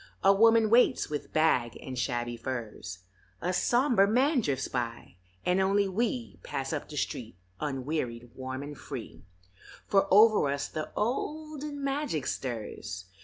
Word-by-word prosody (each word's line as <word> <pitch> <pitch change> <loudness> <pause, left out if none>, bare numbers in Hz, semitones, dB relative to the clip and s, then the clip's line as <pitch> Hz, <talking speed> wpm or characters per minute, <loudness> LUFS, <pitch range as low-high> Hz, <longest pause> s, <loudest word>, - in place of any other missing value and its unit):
A 195 - +7
woman 225 +1 +5
waits 240 -8 +4
with 150 - -4
bag 130 -7 +2
and 130 - -7
shabby 120 -1 -1
furs, 115 -6 -6 0.4
A 180 - -1
somber 240 -1 +3
man 255 +5 +3
drifts 140 - -1
by, 120 -6 -4 0.3
and 180 +1 +3
only 200 +1 +3
we 190 - -2
Pass - - -4
up - - -4
the - - -7
street - - -3 0.2
unwearied, 130 -4 -3
warm 130 +1 -5
and 145 +1 -7
free, - - -8 0.6
For 195 -1 +3
over 210 -6 +6
us 140 0 -1
the 155 - -5
olden 295 +5 -3
magic 275 - -1
stirs. 105 -7 -4
155 Hz, 140 wpm, -29 LUFS, -, 0.6 s, A